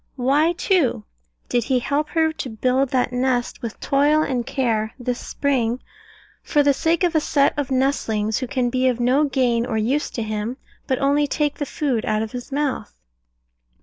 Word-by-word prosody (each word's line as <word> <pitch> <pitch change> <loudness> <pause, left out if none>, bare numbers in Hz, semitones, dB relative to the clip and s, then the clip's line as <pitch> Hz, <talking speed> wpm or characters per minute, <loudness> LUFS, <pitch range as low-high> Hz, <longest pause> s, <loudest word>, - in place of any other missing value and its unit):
Why, 285 +6 +2
too, 340 - +1 0.4
did 240 -2 0
he 260 -1 +2
help 285 +5 -1
her 320 -1 +1
to 270 - -5
build 255 +4 +1
that 250 -1 +1
nest 250 0 0
with 230 -3 -6
toil 295 +3 +3
and 245 -5 -2
care 220 -5 -1
this 245 -1 -3
spring, 250 -4 -1 0.6
for 295 - +2
the 285 0 +4
sake 330 +5 +1
of 350 -1 +2
a 315 - +4
set 285 -2 +2
of 290 -3 -2
nestlings 225 -5 0
who 255 - -3
can 250 -2 -1
be 255 +1 +2
of 250 -2 +1
no 255 +5 +3
gain 250 -4 +1
or 235 -2 -2
use 255 +7 0
to 230 - -1
him, 215 +3 -3 0.3
but 260 - +1
only 285 +2 +2
take 295 0 -1
the 290 - -2
food 255 -7 -1
out 215 -1 +1
of 220 - -6
his 250 +2 -7
mouth? 280 - -2
260 Hz, 185 wpm, -22 LUFS, 240-290 Hz, 0.6 s, the